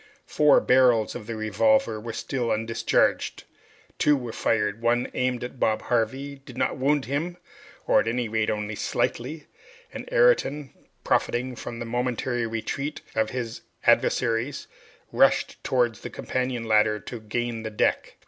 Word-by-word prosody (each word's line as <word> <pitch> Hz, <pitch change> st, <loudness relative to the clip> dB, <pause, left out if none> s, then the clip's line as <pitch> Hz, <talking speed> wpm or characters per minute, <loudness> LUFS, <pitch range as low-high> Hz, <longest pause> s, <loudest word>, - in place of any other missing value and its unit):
Four 150 Hz, -1 st, +5 dB
barrels 125 Hz, -4 st, +4 dB
of 110 Hz, -3 st, -8 dB
the 115 Hz, -, -4 dB
revolver 110 Hz, 0 st, +2 dB
were 115 Hz, +2 st, -6 dB
still 120 Hz, +1 st, -3 dB
undischarged. 115 Hz, +1 st, 0 dB, 0.6 s
Two 150 Hz, -1 st, +4 dB
were 120 Hz, -3 st, -5 dB
fired 105 Hz, -1 st, 0 dB
one, 120 Hz, +1 st, +1 dB
aimed 125 Hz, -1 st, -1 dB
at 125 Hz, +1 st, -7 dB
Bob 110 Hz, -1 st, +1 dB
Harvey, 130 Hz, +4 st, -1 dB
did 135 Hz, -2 st, -13 dB
not -, -, 0 dB
wound 140 Hz, +1 st, +1 dB
him, 160 Hz, +7 st, -2 dB, 0.5 s
or -, -, +4 dB
at -, -, -1 dB
any 120 Hz, +1 st, 0 dB
rate 110 Hz, 0 st, 0 dB
only 105 Hz, 0 st, -2 dB
slightly, 145 Hz, +8 st, -2 dB, 0.5 s
and -, -, -7 dB
Ayrton, -, -, +2 dB, 0.3 s
profiting 125 Hz, +2 st, 0 dB
by 120 Hz, -1 st, -7 dB
the 120 Hz, -, -5 dB
momentary 120 Hz, 0 st, -1 dB
retreat 115 Hz, +6 st, -4 dB
of 110 Hz, -1 st, +1 dB
his 120 Hz, -3 st, -5 dB, 0.2 s
adversaries, 120 Hz, +3 st, +2 dB, 0.5 s
rushed -, -, +2 dB
towards 120 Hz, -3 st, +1 dB
the -, -, -6 dB
companion 125 Hz, -2 st, -3 dB
ladder 105 Hz, -1 st, +3 dB
to 120 Hz, +5 st, -7 dB
gain 115 Hz, +1 st, -3 dB
the 110 Hz, -, -4 dB
deck. 105 Hz, -, 0 dB
120 Hz, 150 wpm, -25 LUFS, 110-130 Hz, 0.6 s, Four